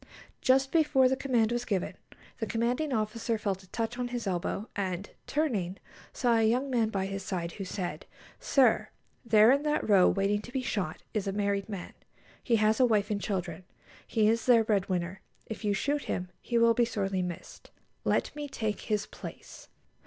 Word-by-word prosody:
Just 265 +1 +3
before 300 -5 +4
the 260 - +2
command 245 -4 +1
was 240 0 -1
given, 195 -5 -1 0.5
the 220 - -2
commanding 245 +6 0
officer 225 0 -1
felt 200 -3 -2
a 190 - -19
touch 230 +2 -3
on 245 - -1
his 245 -1 -4
elbow, 190 +3 -2
and, 190 -1 -3 0.2
turning, 210 - -1 0.3
saw 240 -3 +2
a 220 -1 +4
young 260 +4 0
man 230 -3 +2
by 195 -3 -1
his 195 0 -4
side, 175 -3 -3
who 195 - -6
said, 185 -1 -5 0.3
"Sir, 255 -5 +3 0.3
there 220 -1 +6
in 280 +1 +3
that 300 0 0
row, 195 -4 +6
waiting 200 +1 +1
to 240 - -11
be 260 0 -2
shot, 200 -10 -3
is 210 -2 -1
a - - 0
married 200 0 -1
man. 195 -4 -6 0.5
He 235 - +2
has 215 +1 +3
a 255 - +6
wife 210 -2 +1
and 200 -1 -1
children. 180 -3 -3 0.4
He 215 -2 +2
is 225 +2 +1
their 235 -2 +6
bread 205 -3 0
winner. 185 +1 -2 0.2
If 220 - -7
you 205 -1 +1
shoot 285 +8 -1
him, 180 0 -3
he 240 - -1
will 230 0 +5
be 240 - +3
sorely 195 -5 -1
missed. 175 -2 -7 0.3
_Let - - 0
me 295 -1 -4
take 220 -5 -3
his 210 -1 -1
place. - - -10
215 Hz, 190 wpm, -29 LUFS, 195-245 Hz, 0.5 s, there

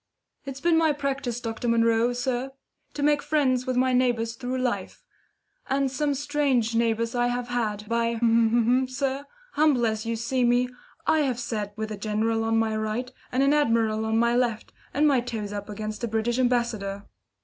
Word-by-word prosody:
"It's 270 -1 -5
been 330 +2 +3
my 320 -2 +3
practice, 275 -4 -3
Dr. 230 0 -4
Munro, 230 0 +3
sir, 250 +2 -2 0.4
to 290 - -2
make 295 0 +3
friends 260 -4 +1
with 255 -1 0
my 255 0 +3
neighbours 240 -2 +1
through 250 +2 -4
life; 255 -1 -3 0.7
and 270 0 +1
some 285 +1 0
strange 275 -5 0
neighbours 230 0 +1
I 245 0 +1
have 245 0 -2
had. 215 -4 -2
By, 230 0 0 0.7
sir, 270 +1 -2 0.3
humble 290 -5 +3
as 220 -1 -1
you 230 - 0
see 240 +3 -1
me, 245 +1 +3 0.4
I 315 - +3
have 260 -5 0
sat 210 -4 -4
with 220 0 -4
a 210 - -4
general 220 +2 0
on 225 0 +1
my 220 -1 +1
right, 215 +4 -2 0.2
and 260 +2 +2
an 275 +1 +4
admiral 225 -6 +2
on 220 0 +1
my 235 +1 +3
left, 240 -3 -1 0.2
and 300 +2 +3
my 275 -3 +4
toes 220 -4 -5
up 205 0 -6
against 215 +1 -5
a - - +1
British 225 +2 -1
ambassador. 235 -6 0
240 Hz, 180 wpm, -26 LUFS, 225-260 Hz, 0.7 s, an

